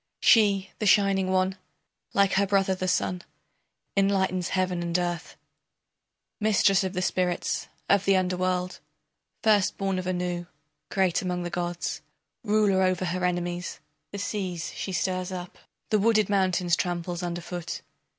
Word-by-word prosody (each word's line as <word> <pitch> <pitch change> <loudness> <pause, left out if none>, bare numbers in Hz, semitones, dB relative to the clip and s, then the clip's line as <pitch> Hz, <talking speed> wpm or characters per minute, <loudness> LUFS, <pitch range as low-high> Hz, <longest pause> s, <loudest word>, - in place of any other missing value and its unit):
She, 200 -4 +4
the 215 - 0
shining 195 -1 +4
one, 185 0 +1 0.6
like 200 -1 +4
her 200 +1 +3
brother, 195 -1 +2
the 185 0 -3
sun, 180 0 0 0.7
Enlightens 190 -2 +1
Heaven 185 -1 0
and 170 0 0
earth, 175 -1 -3 1.0
Mistress 205 -2 +3
of 190 0 -3
the 185 -1 -1
spirits 180 -1 -1 0.2
of 200 0 +3
the 195 - +4
underworld, 180 0 -1 0.6
First 210 -4 +3
born 195 -1 -1
of 185 - -5
Anu, 180 -1 -2 0.4
great 190 -3 +1
among 180 -1 -2
the 175 - -4
gods, 175 0 -3 0.4
Ruler 210 -3 +3
over 185 0 +1
her 180 +1 -2
enemies, 175 0 -2 0.3
The 200 - -5
seas 190 -5 -3
she 195 - -4
stirs 185 0 -1
up, 180 -1 -7 0.3
The 215 - +4
wooded 215 -1 +3
mountains 185 -3 +2
tramples 175 -1 -2
under 175 -1 -3
foot. 175 0 -6
185 Hz, 140 wpm, -27 LUFS, 180-195 Hz, 1.0 s, She